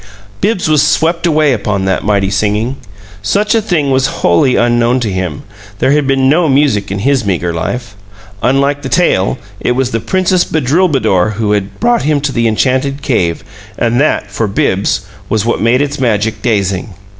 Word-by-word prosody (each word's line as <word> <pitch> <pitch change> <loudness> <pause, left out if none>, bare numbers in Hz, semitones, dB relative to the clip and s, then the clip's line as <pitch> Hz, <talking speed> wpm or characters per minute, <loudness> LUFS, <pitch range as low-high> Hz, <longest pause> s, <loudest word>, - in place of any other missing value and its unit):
Bibbs 210 -6 0
was 155 -2 +3
swept 165 +3 +1
away 155 -3 +3
upon 100 -3 -2
that 95 -1 0
mighty 100 -2 +1
singing. 105 +6 -1 0.4
Such 205 - +1
a 225 - +2
thing 170 -10 0
was 130 0 +2
wholly 90 +9 +3
unknown 120 +1 +2
to 110 -4 -1
him; 90 -5 -4 0.3
there 130 - +1
had 145 -1 +2
been 135 -1 +2
no 160 +3 +3
music 135 -8 +1
in 95 - -3
his 130 +4 +1
meager 90 -4 -1
life. 105 +7 -4 0.5
Unlike 140 +3 +1
the 135 - -5
tale, 115 - +1 0.2
it 125 - 0
was 130 0 -1
the 115 - -1
Princess 185 - +1
Bedrulbudour 130 - +1
who 105 0 -1
had 100 -1 -2
brought 240 0 +2
him 150 0 +1
to 145 -1 -1
the 115 -3 0
enchanted 130 +5 0
cave, 85 -9 0 0.3
and 120 +2 +1
that 105 -8 0
for 110 +1 -1
Bibbs 100 0 0 0.3
was 110 -1 0
what 120 - 0
made 125 +5 +3
its 145 0 -4
magic 110 -3 0
dazing. 100 -4 -1
125 Hz, 180 wpm, -13 LUFS, 105-145 Hz, 0.5 s, was